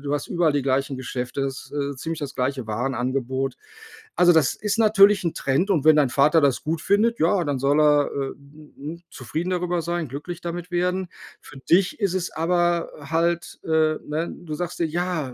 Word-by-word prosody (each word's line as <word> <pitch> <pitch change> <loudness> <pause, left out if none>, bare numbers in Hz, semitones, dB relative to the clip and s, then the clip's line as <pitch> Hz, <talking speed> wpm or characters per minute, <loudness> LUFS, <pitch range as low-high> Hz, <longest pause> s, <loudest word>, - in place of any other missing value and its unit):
du 145 0 -3
hast 145 - -3
überall 170 -3 +2
die 145 -2 0
gleichen 135 0 0
Geschäfte, 130 +1 -4
ist, 135 +1 -5
äh, 140 -1 -2
ziemlich 165 +4 -4
das 145 -2 -5
gleiche 130 -2 -2
Warenangebot. 130 +3 -2 0.6
Also, 175 0 +5
das 160 -5 +3
ist 215 +2 -2
natürlich 205 -2 +5
'n 170 - -1
Trend 140 +9 0
und 155 -5 +1
wenn 155 -1 +7
dein 140 -4 +3
Vater 150 +4 +4
das 140 -3 +1
gut 160 +1 -2
findet, 225 +4 +2
ja, 175 +2 +2
dann 140 -3 -2
soll 140 +3 +2
er, 150 -1 +4
äh, 135 -1 -3
hm, 145 +2 -17
hm, 160 +5 -8
zufrieden 160 +8 -4
darüber 180 -1 -1
sein, 170 -1 -2
glücklich 160 +6 -7
damit 175 +1 -6
werden. 180 +1 -1 0.3
Für 135 - -13
dich 180 - +2
ist 195 -3 0
es 180 -1 -2
aber 175 +1 +1 0.2
halt, 170 +1 0
äh 155 -1 +2
ne, 155 +3 -3
du 155 -3 -7
sagst 175 +2 -5
dir: 165 - +1
„Ja, 170 -5 -2
155 Hz, 195 wpm, -23 LUFS, 140-175 Hz, 0.6 s, wenn